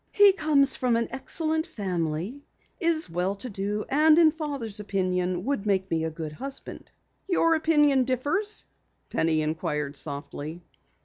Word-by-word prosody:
"He 405 -1 +7
comes 295 -6 +3
from 250 -2 +1
an 230 0 0
excellent 315 +4 -1
family, 180 - -3 0.4
is 330 -3 +2
well 180 +4 -1
to 230 +4 -6
do, 205 +2 -2
and 305 +3 +5
in 325 -2 +6
Father's 280 -9 -4
opinion 185 -2 -1
will 280 -3 0
make 195 -3 0
me 160 -1 0
a - - -1
good 160 -1 -6
husband." 270 - -6 0.4
"Your 330 -2 +3
opinion 295 -4 +3
differs?" 300 - -1 0.5
Penny 160 -1 +1
inquired 150 -2 -2
softly. 150 +3 -5
230 Hz, 140 wpm, -26 LUFS, -, 0.5 s, He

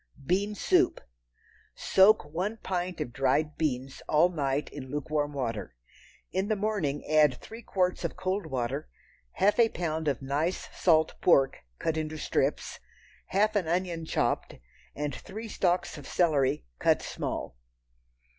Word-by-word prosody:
Bean 200 +6 +1
Soup. - - +3 0.8
Soak 200 0 +5
one 180 +9 -3
pint 180 -3 -3
of 120 -6 -4
dried 140 +4 +1
beans 135 -4 -2
all 155 +4 +5
night 145 -4 -1
in 130 -3 -8
lukewarm 145 +1 -1
water. 115 - -4 0.6
In 190 +2 0
the 215 - +1
morning 195 -9 -1
add 150 -3 +4
three 225 - -11
quarts 185 -5 0
of - - -2
cold 185 0 -2
water, 135 +1 -3 0.4
half 205 +4 +2
a 230 -1 +6
pound 160 -4 -3
of 140 -4 +1
nice 145 +6 -1
salt 160 -3 +3
pork, 135 -6 +4 0.2
cut 160 0 -1
into 155 0 -3
strips, - - -1 0.5
half 215 +3 +2
an 190 -5 +1
onion 175 -1 -1
chopped, - - -1 0.4
and 145 -1 -2
three 220 - -7
stalks 180 -6 0
of 140 - -11
celery, 140 - +2
cut - - +3
small. - - -4
160 Hz, 140 wpm, -29 LUFS, 140-185 Hz, 0.8 s, a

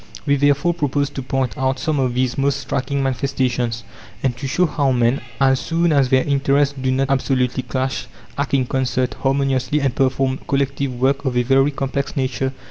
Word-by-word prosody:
We 140 -2 +3
therefore 145 +4 +2
propose 145 -3 -1
to 135 - -5
point 130 -1 -2
out 130 0 +1
some 155 0 -1
of 125 -2 0
these 125 -1 0
most 140 0 +1
striking 140 +1 -2
manifestations, 125 -3 -1 0.4
and 130 -3 +1
to 135 - -4
show 180 +7 +2
how 145 -4 +1
men, 120 +1 +2 0.2
as 135 -1 +3
soon 165 +5 +1
as 135 -3 +3
their 130 0 +4
interests 140 0 +2
do 130 - 0
not 135 +1 +1
absolutely 130 -2 +1
clash, 130 +2 -3 0.3
act 140 -1 -1
in 130 -2 +2
concert, 125 0 -1
harmoniously, 135 0 +1
and 135 -3 0
perform 130 0 +1
collective 140 -1 -1
work 135 +2 +1
of 130 -3 -1
a 125 - +3
very 135 +3 +3
complex 140 0 -3
nature. 130 0 -1
135 Hz, 185 wpm, -20 LUFS, 130-140 Hz, 0.4 s, their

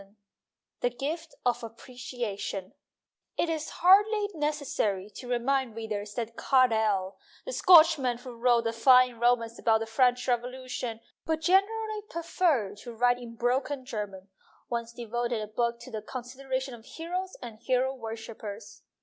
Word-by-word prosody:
XXVI 195 +1 -20 0.6
THE 245 - +1
GIFT 305 +7 -5
OF 245 0 +1
APPRECIATION 230 -4 -5 0.6
IT 340 - +1
is 315 -1 -3
hardly 410 +3 +4
necessary 285 - -1
to 245 +5 -9
remind 250 0 0
readers 210 -2 -5
that 230 -1 -4
Carlyle, 220 -7 +2 0.3
the - - -4
Scotchman 315 - +6
who 245 +1 -9
wrote 235 0 +3
a 230 - 0
fine 250 0 +5
romance 235 -1 +2
about 220 -1 +3
the 225 - -3
French 245 +2 +2
Revolution 250 -1 -3 0.2
but 320 0 -1
generally 420 +5 +2
preferred 320 - 0
to 235 +2 -9
write 245 +1 +3
in 235 -1 -9
broken 255 +3 -1
German, 205 -5 -6 0.4
once 235 -1 -2
devoted 240 0 -2
a 215 - -3
book 235 +2 -1
to 255 - -10
the 215 -2 -4
con 245 +3 -6
sideration 260 +1 -4
of 230 -2 -11
Heroes 360 +7 -5
and 230 -3 -9
Hero 260 +2 +1
Worshippers. 225 -3 -8
245 Hz, 145 wpm, -28 LUFS, 225-275 Hz, 0.6 s, Scotchman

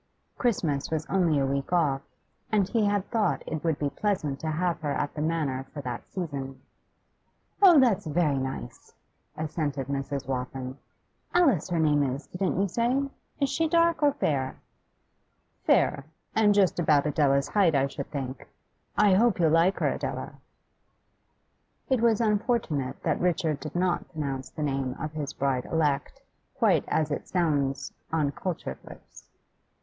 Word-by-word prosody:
Christmas 165 - 0
was 160 -1 -2
only 175 -6 +3
a 135 - +2
week 140 +2 -2
off, 150 -6 +2 0.5
and 205 -3 +3
he 225 -3 +2
had 205 -1 0
thought 215 -5 +1
it 155 -1 -4
would 160 -3 +1
be 145 -1 -1
pleasant 160 -10 -1
to 160 - -3
have 170 +2 -1
her 150 -2 -1
at 145 0 -2
the 150 - -4
Manor 150 -5 -1
for 145 - -6
that 125 -3 -6
season. 140 -7 -5 1.0
'Oh, 355 -6 +8
that's 235 -10 +3
very 150 -3 +1
nice!' 130 - -6 0.4
assented 150 -3 -2
Mrs. 140 0 -3
Waltham. 130 0 -4 0.6
'Alice, 275 - +3
her 175 - 0
name 150 -2 +3
is, 140 +1 -2
didn't 185 0 -2
you 200 - +2
say? 250 +7 0 0.3
Is 280 - +2
she 325 - +1
dark 335 0 +3
or 290 -1 +4
fair?' 135 - -1 1.1
'Fair, 140 -2 +3 0.3
and 210 -2 +4
just 195 -3 +3
about 155 -4 +3
Adela's 140 -2 +2
height, 190 -7 +3
I 135 0 +3
should 140 0 -6
think. 135 -3 -5 0.5
I 205 -2 +5
hope 215 +1 +3
you'll 160 -3 +4
like 170 +4 +4
her, - - +1
Adela.' - - -4 1.6
It 260 -4 +2
was 230 -2 +3
unfortunate 210 - 0
that - - 0
Richard 170 -4 +1
did 155 +1 -7
not 175 0 0
pronounce 140 -5 -4
the 155 - -5
name 135 -3 -1
of 155 +1 -4
his 150 -2 -4
bride 135 -3 -1
elect 150 -4 -1 0.3
quite - - +3
as 155 -1 0
it 145 - -3
sounds 145 -6 0 0.2
on 155 -3 +1
cultured 155 - -4
lips. - - -14
155 Hz, 155 wpm, -27 LUFS, 140-195 Hz, 1.6 s, Oh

